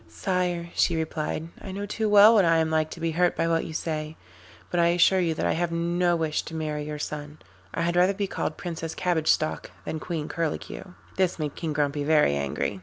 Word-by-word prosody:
'Sire,' 170 Hz, -, -2 dB
she 170 Hz, -, +2 dB
replied, 160 Hz, 0 st, -3 dB
'I 190 Hz, -, -7 dB
know 200 Hz, +1 st, -4 dB
too 215 Hz, +1 st, -1 dB
well 210 Hz, +2 st, +8 dB
what 210 Hz, -4 st, +5 dB
I 165 Hz, -1 st, +4 dB
am 160 Hz, 0 st, +1 dB
like 155 Hz, 0 st, +1 dB
to 165 Hz, -, -9 dB
be 165 Hz, 0 st, -1 dB
hurt 175 Hz, +2 st, +1 dB
by 165 Hz, -, +1 dB
what 165 Hz, 0 st, +1 dB
you -, -, -7 dB
say, 155 Hz, -1 st, -3 dB, 0.5 s
but 175 Hz, -, +1 dB
I 170 Hz, -, +5 dB
assure 175 Hz, +2 st, +4 dB
you 165 Hz, -3 st, +1 dB
that -, -, -2 dB
I -, -, +2 dB
have 170 Hz, 0 st, -1 dB
no 175 Hz, +1 st, +1 dB
wish 160 Hz, -2 st, 0 dB
to 165 Hz, -, -7 dB
marry 150 Hz, -2 st, -3 dB
your 150 Hz, 0 st, -5 dB
son 150 Hz, 0 st, -6 dB, 0.3 s
I 165 Hz, -, -2 dB
had 170 Hz, +1 st, 0 dB
rather 180 Hz, +2 st, +4 dB
be 200 Hz, 0 st, -1 dB
called 155 Hz, -4 st, -3 dB
Princess 165 Hz, -2 st, -5 dB
Cabbage 170 Hz, -4 st, 0 dB
Stalk 155 Hz, -, +1 dB, 0.2 s
than 160 Hz, -, -3 dB
Queen 160 Hz, -2 st, -4 dB
Curlicue.' 165 Hz, +3 st, -4 dB, 0.2 s
This 185 Hz, -2 st, +1 dB
made 150 Hz, -3 st, -3 dB
King 160 Hz, -3 st, -4 dB
Grumpy 145 Hz, 0 st, 0 dB
very 150 Hz, -, +3 dB
angry. 70 Hz, +7 st, -2 dB
165 Hz, 225 wpm, -26 LUFS, 155-175 Hz, 0.5 s, well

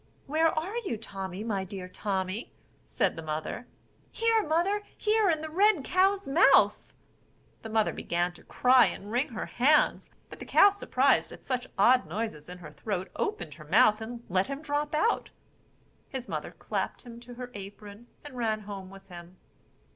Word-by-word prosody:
"Where 315 Hz, +3 st, +2 dB
are 330 Hz, +8 st, -2 dB
you, 395 Hz, -, -3 dB
Tommy, 195 Hz, -2 st, -6 dB
my 205 Hz, -4 st, -2 dB
dear 190 Hz, -1 st, -7 dB
Tommy?" 190 Hz, +2 st, -3 dB, 0.4 s
said -, -, 0 dB
the 165 Hz, -, -6 dB
mother. 155 Hz, +9 st, -5 dB, 0.4 s
"Here, 455 Hz, -1 st, +2 dB
mother, 365 Hz, +4 st, +1 dB, 0.2 s
here 430 Hz, -1 st, +2 dB
in 315 Hz, -2 st, +1 dB
the 315 Hz, -, -5 dB
red 390 Hz, -2 st, +3 dB
cow's 385 Hz, +4 st, +2 dB
mouth." 275 Hz, -, +4 dB, 0.7 s
The 225 Hz, -, -8 dB
mother 220 Hz, -1 st, +1 dB
began 175 Hz, +1 st, -1 dB
to -, -, -17 dB
cry 250 Hz, 0 st, +5 dB
and 205 Hz, +2 st, -6 dB
wring 250 Hz, +6 st, 0 dB
her 225 Hz, -3 st, -5 dB
hands; 295 Hz, +5 st, +2 dB, 0.2 s
but -, -, -12 dB
the -, -, -8 dB
cow 400 Hz, -, +6 dB
surprised 405 Hz, -, +1 dB
at -, -, -12 dB
such 255 Hz, -1 st, -2 dB
odd 245 Hz, +1 st, +4 dB
noises 175 Hz, -4 st, -5 dB
in 180 Hz, -, -8 dB
her 160 Hz, -4 st, -11 dB
throat, 190 Hz, +2 st, -4 dB
opened 160 Hz, -4 st, -3 dB
her 155 Hz, 0 st, -13 dB
mouth 210 Hz, +6 st, +4 dB
and 235 Hz, +1 st, -7 dB
let 185 Hz, +1 st, +1 dB
him 275 Hz, +2 st, -6 dB
drop 295 Hz, 0 st, -1 dB
out. 450 Hz, +9 st, +1 dB, 0.8 s
His 260 Hz, -2 st, -6 dB
mother -, -, -4 dB
clapped -, -, -4 dB
him 240 Hz, -2 st, -10 dB
into 240 Hz, +1 st, -11 dB
her 245 Hz, 0 st, -8 dB
apron, 205 Hz, +3 st, -10 dB, 0.2 s
and 290 Hz, -3 st, -10 dB
ran 220 Hz, -3 st, -1 dB
home 200 Hz, -2 st, -8 dB
with 195 Hz, 0 st, -14 dB
him. 175 Hz, 0 st, -12 dB
230 Hz, 175 wpm, -28 LUFS, 190-300 Hz, 0.8 s, cow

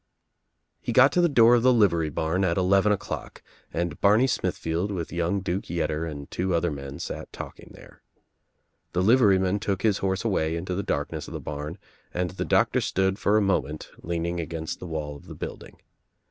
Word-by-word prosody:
He -, -, -3 dB
got -, -, +6 dB
to 180 Hz, -, +3 dB
the 175 Hz, -, +4 dB
door 120 Hz, -4 st, +6 dB
of 120 Hz, -, +5 dB
the 130 Hz, +2 st, +5 dB
livery 85 Hz, -9 st, +3 dB
barn 80 Hz, +5 st, -1 dB
at 85 Hz, -1 st, +1 dB
eleven 95 Hz, +2 st, +3 dB
o'clock 100 Hz, -, -4 dB, 0.3 s
and 85 Hz, -2 st, -3 dB
Barney 105 Hz, +5 st, +5 dB
Smithfield 85 Hz, -7 st, -1 dB
with 85 Hz, -5 st, -4 dB
young 85 Hz, +3 st, 0 dB
Duke 95 Hz, +1 st, -2 dB
Yetter 80 Hz, -1 st, -1 dB
and 70 Hz, -2 st, -8 dB
two 90 Hz, 0 st, 0 dB
other 85 Hz, 0 st, +1 dB
men 70 Hz, -1 st, -7 dB
sat -, -, -6 dB
talking -, -, -9 dB
there. -, -, -16 dB, 0.9 s
The 90 Hz, +2 st, +1 dB
liveryman 100 Hz, -4 st, +4 dB
took 100 Hz, -2 st, -2 dB
his 105 Hz, -3 st, +2 dB
horse 95 Hz, 0 st, -1 dB
away 80 Hz, -7 st, +1 dB
into 90 Hz, +2 st, -3 dB
the 95 Hz, -, -1 dB
darkness 75 Hz, -3 st, -3 dB
of -, -, -7 dB
the -, -, -3 dB
barn 75 Hz, +4 st, -5 dB, 0.4 s
and 90 Hz, 0 st, -1 dB
the 95 Hz, -, -4 dB
doctor -, -, +3 dB
stood 95 Hz, +1 st, 0 dB
for 105 Hz, +1 st, +3 dB
a 105 Hz, -, +3 dB
moment 75 Hz, -6 st, -1 dB
leaning 85 Hz, +1 st, -2 dB
against 80 Hz, -1 st, -4 dB
the 90 Hz, -, -7 dB
wall 75 Hz, -3 st, -4 dB
of 70 Hz, -, -14 dB
the -, -, -9 dB
building. -, -, -8 dB
90 Hz, 190 wpm, -26 LUFS, 80-100 Hz, 0.9 s, got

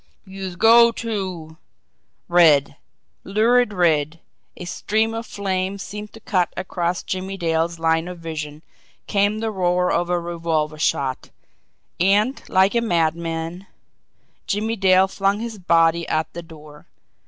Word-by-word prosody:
"Youse 190 Hz, -2 st, -7 dB
go 230 Hz, +4 st, +6 dB
to 185 Hz, -9 st, -5 dB, 0.3 s
" -, -, -48 dB
Red, 155 Hz, -6 st, +4 dB, 0.5 s
lurid 225 Hz, +4 st, +2 dB
red, 165 Hz, -4 st, +1 dB, 0.4 s
a 180 Hz, -, -7 dB
stream 220 Hz, +5 st, -1 dB
of 225 Hz, 0 st, -5 dB
flame 190 Hz, -1 st, -2 dB
seemed 210 Hz, +2 st, -8 dB
to 225 Hz, -, -12 dB
cut 185 Hz, -5 st, 0 dB
across 175 Hz, -1 st, -2 dB
Jimmie 190 Hz, +1 st, -4 dB
Dale's 165 Hz, -1 st, -1 dB
line 165 Hz, +1 st, +1 dB
of 180 Hz, -1 st, -7 dB
vision, 155 Hz, -2 st, -7 dB, 0.4 s
came 205 Hz, +1 st, +1 dB
the 225 Hz, -1 st, -1 dB
roar 180 Hz, -2 st, +1 dB
of 175 Hz, +1 st, 0 dB
a 175 Hz, 0 st, +1 dB
revolver 165 Hz, -3 st, -2 dB
shot 135 Hz, -3 st, -1 dB, 0.7 s
and 205 Hz, +8 st, +2 dB
like 190 Hz, +1 st, +3 dB
a 235 Hz, -, +2 dB
madman 165 Hz, -1 st, -2 dB, 0.8 s
Jimmie 220 Hz, +3 st, -1 dB
Dale 190 Hz, -2 st, +4 dB
flung 195 Hz, +1 st, 0 dB
his 225 Hz, -2 st, -6 dB
body 170 Hz, -1 st, +2 dB
at 155 Hz, 0 st, -1 dB
the 170 Hz, -, -6 dB
door. 155 Hz, -3 st, -14 dB
180 Hz, 135 wpm, -21 LUFS, 165-200 Hz, 0.8 s, go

